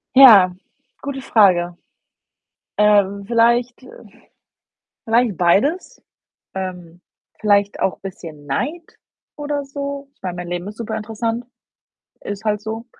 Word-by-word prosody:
Ja, 205 -9 +8 0.5
gute 275 -1 -5
Frage. 180 -8 +3 1.0
Ähm, 200 -1 +3
vielleicht 235 +2 +2
äh, - - -14 1.0
vielleicht 230 -4 +2
beides, 280 - +1 0.5
ähm, 180 -2 -6 0.4
vielleicht 205 -1 +2
auch 190 - 0
bisschen 165 -6 -9
Neid 300 - -4 0.4
oder 290 -1 -3
so. 280 0 -6
Ich - - -42
meine, 180 -2 -4
mein 175 0 -6
Leben 175 +1 -4
ist 210 +1 -9
superinteressant, 225 +1 -4 0.8
ist 205 +1 -7
halt 210 -1 0
so. 220 +2 -6
210 Hz, 110 wpm, -20 LUFS, 185-245 Hz, 1.0 s, Ja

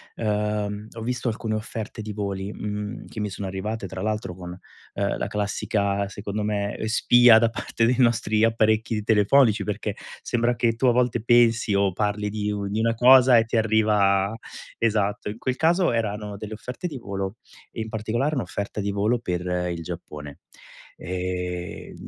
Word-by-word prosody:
uhm, 105 -1 -2
ho 115 - -8
visto 125 +2 -2
alcune 110 -1 -2
offerte 110 0 -5
di 105 0 -6
voli, 100 -1 -4
mhmm, 105 +2 -5
che - - -8
mi 105 -1 -2
sono 95 +1 -5
arrivate 100 +3 -4
tra 95 +1 -6
l'altro 105 -2 -2
con, 90 -1 -8 0.4
uhm, - - -1
la - - -2
classica 100 -1 -1
secondo 100 +1 -4
me 105 -1 -2
spia 120 +1 +6
da 115 0 +3
parte 115 0 -1
dei 125 +2 +3
nostri 115 -3 +3
apparecchi 110 -1 +1
telefonici 110 +1 +4
perché 105 0 -3 0.3
sembra 120 0 0
che 115 0 +1
tu 115 - -1
a 125 - +6
volte 120 -1 +1
pensi 115 -2 +4
o 100 0 +2
parli 105 +2 -1
di 105 0 -2
u 100 -1 -3
di 105 +2 -2
una 115 +1 +2
cosa 125 +1 +7
e 115 - +5
ti 115 - -1
arriva 105 -3 +3 0.4
esatto, 105 -2 0
in 105 - -6
quel 130 +1 -2
caso 175 +3 +3
erano 105 -3 -2
delle 105 +1 -7
offerte 125 - -6
di 150 -5 -6
volo 100 -2 -5 0.3
e 115 - -5
in 110 - -5
particolare 115 +7 -1
un'offerta 100 - -4
di 100 - -1
volo 105 +4 +1
per 90 -6 -3 0.3
il 85 -1 -4
Giappone. 75 -1 -8 0.6
Ehm, 90 0 -4
105 Hz, 170 wpm, -24 LUFS, 100-115 Hz, 0.6 s, cosa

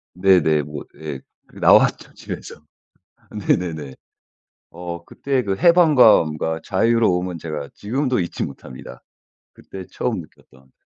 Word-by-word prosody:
네네. 90 -5 +3
뭐 75 0 -8 0.2
예 75 -3 -5 0.3
그 - - -17
나왔죠 - - +3
집에서. - - -9 0.9
네네네. 80 -6 -1 0.8
어 85 0 -7
그때 135 -2 -2
그 100 -2 -1
해방감과 110 - +4
자유로움은 95 -4 +1
제가 75 -3 -6
지금도 130 +4 -1
잊지 85 -2 -3
못합니다 65 -2 -10 0.5
그때 95 -1 -10
처음 - - -2
느꼈던. 65 0 -21
90 Hz, 250 characters per minute, -21 LUFS, 75-110 Hz, 0.9 s, 해방감과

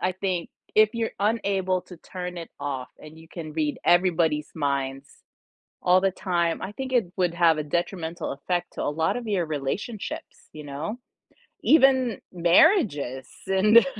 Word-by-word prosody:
I 185 - +1
think, 185 -2 -2 0.3
if 215 0 +6
you're 230 -1 -1
unable 200 -4 +1
to 180 -1 -12
turn 180 -1 -6
it 165 - -8
off 135 -3 -4
and 155 +1 -13
you 160 0 -15
can 160 -4 -7
read 150 -2 -1
everybody's 165 -4 +3
minds 140 -2 -2 0.7
all 180 +1 +4
the 195 - +2
time, 175 -3 -1
I 190 - -4
think 260 +4 -6
it 215 -8 +2
would 180 -2 +1
have 165 -2 +4
a 155 - -1
detrimental 170 +1 -3
effect 175 +5 -3
to - - -4
a - - -1
lot 160 +8 0
of 235 - -6
your 190 -5 0
relationships, 155 - -5
you 155 -1 -9
know, 145 +10 -5 0.7
even 260 -7 +4
marriages 170 - +3 0.2
and 210 +5 +6
175 Hz, 160 wpm, -25 LUFS, 155-195 Hz, 0.7 s, if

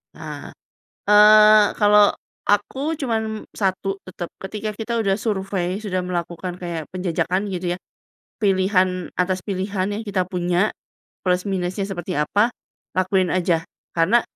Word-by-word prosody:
Ah! - - -8 0.5
Eee, 210 0 +7
kalau 205 0 +5 0.3
aku 270 +10 +1
cuman 220 -6 -2
satu, 195 0 -1
tetap. 175 -2 -6
Ketika 215 +2 -4
kita 225 +2 -4
udah 200 -1 +1
survei, 195 -2 -2
sudah 185 -3 -1
melakukan 175 0 -4
kayak 170 -4 -5
penjajakan 185 +2 -1
gitu 175 -1 -2
ya, - - -10 0.6
pilihan 185 -3 +1
atas 185 0 0
pilihan 195 0 -2
yang 205 +2 -3
kita 195 -2 0
punya, 180 +2 +1 0.6
plus 180 0 +2
minusnya 185 +1 -2
seperti 180 -2 -5
apa, 205 +10 +2 0.4
lakuin 185 0 +1
aja. 170 -2 +1 0.3
Karena 190 +8 +4
190 Hz, 125 wpm, -22 LUFS, 180-210 Hz, 0.6 s, Eee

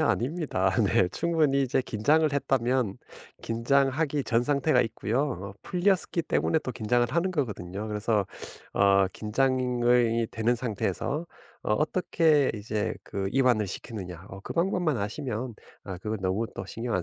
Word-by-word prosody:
아닙니다. 135 - +1
네. 95 -1 +3
충분히 155 - +1
이제 130 0 +1
긴장을 150 +8 +2
했다면 130 -5 +1 0.5
긴장하기 140 +5 +1
전 115 0 +2
상태가 140 0 +2
있고요. 115 +2 -1
어 95 -3 -6
풀렸었기 180 -1 +1
때문에 160 0 +1
또 130 - -3
긴장을 120 +1 +1
하는 170 +8 0
거거든요. 105 - -3
그래서 105 -1 0 0.5
어 100 -1 +4
긴장이 120 -1 +2
되는 115 +2 +1
상태에서 120 - -2 0.4
어 - - 0
어떻게 155 -2 +2
이제 105 +1 -2
그 95 -1 -3
이완을 125 -5 +3
시키느냐 95 -4 -7
어 95 +1 -9
그 - - -6
방법만 175 - +1
아시면 120 +2 -3 0.3
아 95 -3 -6
그건 105 +2 -3
너무 95 +5 0
또 - - -5
신경 115 0 -4
안 90 - +1
120 Hz, 315 characters per minute, -27 LUFS, 105-140 Hz, 0.5 s, 어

